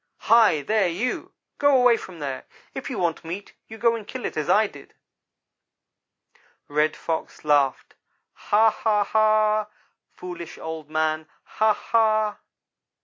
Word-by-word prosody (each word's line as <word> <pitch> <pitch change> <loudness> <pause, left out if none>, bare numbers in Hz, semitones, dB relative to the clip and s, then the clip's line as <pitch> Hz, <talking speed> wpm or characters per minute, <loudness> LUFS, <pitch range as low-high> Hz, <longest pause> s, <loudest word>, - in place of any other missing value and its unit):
'Hi, 220 -10 +4
there, 215 0 +2
you 195 +9 -3 0.3
go 285 -2 +5
away 245 -2 +5
from 185 -5 -9
there! 140 -4 -5 0.3
If 270 - -6
you 250 - -4
want 175 -3 -1
meat 175 +5 -7
you 220 - -10
go 230 0 +2
and 215 -3 -8
kill 255 - -6
it, - - -4
as 155 -2 -3
I 215 +1 +5
did.' 145 -9 -12 1.7
"Red 150 +1 +1
Fox 160 -1 -5
laughed 145 -3 +1 0.4
'Ha! 220 +2 +3
Ha! 210 -1 +1
Ha! 215 0 +2 0.4
foolish 180 -2 -9
Old 160 -2 -7
man 155 0 -1 0.2
Ha! 215 0 +1
ha!' 215 -1 +1
205 Hz, 140 wpm, -24 LUFS, 160-220 Hz, 1.7 s, go